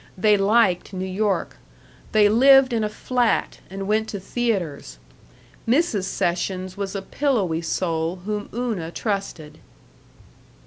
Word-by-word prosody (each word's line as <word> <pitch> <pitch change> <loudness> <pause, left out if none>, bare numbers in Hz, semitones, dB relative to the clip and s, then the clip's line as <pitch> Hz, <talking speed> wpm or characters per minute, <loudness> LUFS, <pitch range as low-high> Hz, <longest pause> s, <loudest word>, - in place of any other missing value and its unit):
They 210 +2 +4
liked 200 -2 +2
New 185 0 -3
York. 190 -1 -1 0.5
They 210 -1 +5
lived 265 +4 +6
in 225 -2 0
a 210 - -1
flat 245 +2 -1
and 195 +1 -6
went 215 +1 +1
to 200 - -5
theaters. 190 - -3 0.7
Mrs. 235 - +1
Sessions 185 0 -2
was 200 -1 -4
a 195 - -4
pillowy 200 - 0
soul 165 0 -1
whom 210 -1 -3
Una 220 -9 -3
trusted. 170 -6 -4
200 Hz, 125 wpm, -23 LUFS, 185-225 Hz, 0.7 s, lived